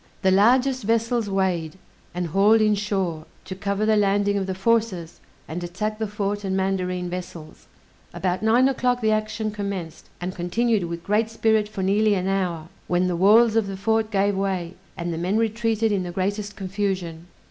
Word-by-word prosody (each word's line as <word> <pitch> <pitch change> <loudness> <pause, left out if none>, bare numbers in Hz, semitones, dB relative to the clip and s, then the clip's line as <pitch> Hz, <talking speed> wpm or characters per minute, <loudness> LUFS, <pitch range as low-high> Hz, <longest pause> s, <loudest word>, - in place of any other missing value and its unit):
The 190 - +4
largest 250 +7 +4
vessels 230 0 0
weighed, 185 -4 -1 0.4
and 180 0 -1
hauled 200 +7 +4
in 215 -1 +3
shore, 195 -6 -2 0.2
to 190 - -6
cover 200 +2 -2
the 215 0 +3
landing 205 0 +2
of 195 -1 -1
the 190 - -3
forces, 195 -5 0 0.3
and 175 +2 -5
attack 210 +5 -3
the 220 - -1
fort 205 0 -3
and 190 -1 -1
mandarine 185 -2 -1
vessels. 175 -3 -8 0.4
About 180 +1 -2
nine 235 +4 +4
o'clock 250 -2 0
the 220 -1 +2
action 215 0 -1
commenced, 200 -6 -6
and 180 +1 -4
continued 205 +3 0
with 170 0 -6
great 215 +2 +1
spirit 220 -2 +1
for 200 -3 -4
nearly 205 +2 +3
an 185 0 -1
hour, 180 -5 -1 0.2
when 180 +1 +1
the 180 -1 0
walls 215 +5 +5
of 225 -3 +2
the 195 -1 -5
fort 220 +2 +1
gave 200 -1 +1
way, 190 -3 -2 0.2
and 170 -1 -3
the 165 - -4
men 185 +5 0
retreated 225 0 0
in 200 -2 +1
the 180 - -4
greatest 200 +3 -2
confusion. 185 -4 -3
200 Hz, 180 wpm, -23 LUFS, 180-215 Hz, 0.4 s, walls